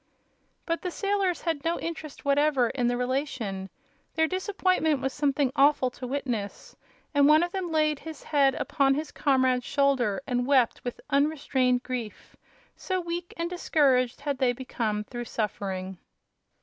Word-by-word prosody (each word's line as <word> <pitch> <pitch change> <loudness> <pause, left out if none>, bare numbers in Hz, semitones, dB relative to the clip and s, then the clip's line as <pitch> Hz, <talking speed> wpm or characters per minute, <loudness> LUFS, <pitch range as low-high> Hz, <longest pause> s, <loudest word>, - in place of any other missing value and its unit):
But 335 -2 -1
the 365 - -2
sailors 395 -1 0
had 325 -4 -1
no 335 +1 0
interest 315 -3 -6
whatever 280 -4 +3
in 245 -3 0
the 245 0 +1
relation. 250 -7 -2 0.5
Their 320 - +3
disappointment 370 -5 +1
was 265 0 -2
something 280 -2 +1
awful 280 -3 +4
to 250 +1 -7
witness, 245 -7 -4 0.4
and 285 -1 +5
one 305 +2 +6
of 350 - -2
them 370 -3 -3
laid 305 -2 +2
his 320 -1 -9
head 275 -3 +3
upon 275 -2 +1
his 305 +1 -4
comrade's 260 -2 +2
shoulder 270 -8 +1
and 245 -1 -1
wept 260 -5 +3
with 245 - -5
unrestrained 275 -4 +2
grief, 240 -4 -6 0.4
so 370 -1 -2
weak 345 0 -4
and 335 0 -1
discouraged 280 -8 +1
had 285 -2 -2
they 255 -2 +3
become 230 -4 -3
through 240 +2 -6
suffering. 190 -4 -4
280 Hz, 150 wpm, -27 LUFS, 250-315 Hz, 0.5 s, one